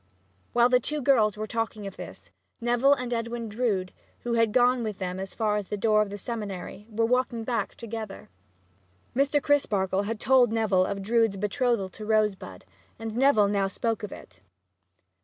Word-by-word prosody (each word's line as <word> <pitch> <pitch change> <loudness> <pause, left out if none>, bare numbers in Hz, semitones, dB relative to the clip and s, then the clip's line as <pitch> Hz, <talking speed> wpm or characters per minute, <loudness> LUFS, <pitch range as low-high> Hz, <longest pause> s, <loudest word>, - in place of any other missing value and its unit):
While 240 0 +5
the 250 0 +5
two 300 +5 -1
girls 230 -7 +3
were 215 - -3
talking 220 -2 -3
of 195 - -7
this, - - -10 0.3
Neville 240 +4 +3
and 250 -2 -4
Edwin 230 0 -3
Drood, 210 -4 -1 0.3
who 240 - -2
had 230 -2 +3
gone 250 +1 +3
with 215 -3 -3
them 185 -1 -4
as 190 0 -6
far 210 -2 +1
as 205 -2 -4
the 210 - -3
door 215 +1 +3
of 210 - -1
the 205 - -6
seminary, 205 -2 -6
were 225 +1 0
walking 245 -1 0
back 235 0 -2
together. 220 - -7 0.8
Mr. 280 +2 +3
Crisparkle 200 -9 +1
had 225 0 -3
told 255 -3 +4
Neville 205 -5 +2
of 195 -1 -4
Drood's 225 -1 +2
betrothal 210 0 0
to 215 - -10
Rosebud, 215 -2 -1 0.3
and 225 -1 -6
Neville 250 -5 +4
now 200 -1 +1
spoke 225 +3 -2
of 210 - -6
it. 90 -2 -12
225 Hz, 175 wpm, -27 LUFS, 205-240 Hz, 0.8 s, While